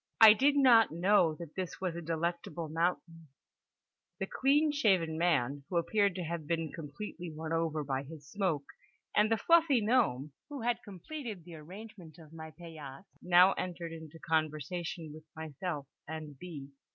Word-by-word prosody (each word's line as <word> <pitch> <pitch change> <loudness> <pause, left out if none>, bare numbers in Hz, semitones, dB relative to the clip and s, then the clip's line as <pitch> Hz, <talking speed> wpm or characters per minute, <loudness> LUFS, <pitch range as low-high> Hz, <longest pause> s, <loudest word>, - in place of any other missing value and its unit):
I 220 -1 +11
did 280 +6 +3
not 245 -5 +7
know 175 -1 +3
that 165 -2 -9
this 185 -2 -5
was 180 -3 -2
a 170 - -4
Delectable 170 0 -3
Mountain…. 165 0 -2 0.9
The 195 - -1
clean 290 +8 +2
shaven 190 - +2
man 145 -5 +1
(who 180 - 0
appeared 200 +3 +2
to 185 - -3
have 165 -2 -4
been 165 -2 -1
completely 170 +3 -7
won 160 +1 -5
over 160 -2 0
by 135 -1 -2
his 145 0 -11
smoke), 175 -6 -1 0.5
and 210 +1 +4
the 225 - +4
fluffy 330 -2 +4
gnome, 210 - +1 0.2
who 285 -3 -6
had 240 0 0
completed 215 - -7
the 175 - -11
arrangement 180 +1 -11
of 160 -2 -15
my 160 -1 -8
paillasse, 155 -2 -10 0.2
now 180 +2 +6
entered 175 -2 -5
into 160 -1 -10
conversation 160 +1 -2
with 155 0 -12
myself 160 -1 -5 0.2
and 155 -1 -6
B. 150 -6 -8
170 Hz, 160 wpm, -32 LUFS, 155-200 Hz, 0.9 s, I